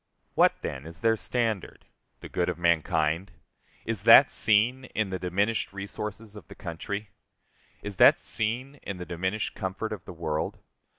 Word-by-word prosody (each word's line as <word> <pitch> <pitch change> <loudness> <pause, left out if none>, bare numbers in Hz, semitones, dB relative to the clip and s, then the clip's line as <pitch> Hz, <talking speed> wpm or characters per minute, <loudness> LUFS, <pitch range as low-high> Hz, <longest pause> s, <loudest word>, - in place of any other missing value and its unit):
What, - - +4
then, 65 +3 -5
is 85 0 -8
their 115 -1 +3
standard? 110 -3 -2 0.4
The - - -8
good 90 0 -1
of 90 - -3
mankind? 85 +1 +1 0.5
Is - - -3
that - - +8
seen 115 +5 +2
in 105 -3 0
the 95 - -3
diminished 100 +5 -1
resources 105 +2 -6
of 100 -8 -11
the - - -12
country? 100 +5 -5 0.7
Is 105 -2 -6
that - - +8
seen 125 +6 -2
in 100 - -5
the 90 - -6
diminished 95 +5 -2
comfort 95 +4 -4
of 100 - -8
the - - -8
world? 80 -2 -3
100 Hz, 160 wpm, -27 LUFS, 85-110 Hz, 0.7 s, that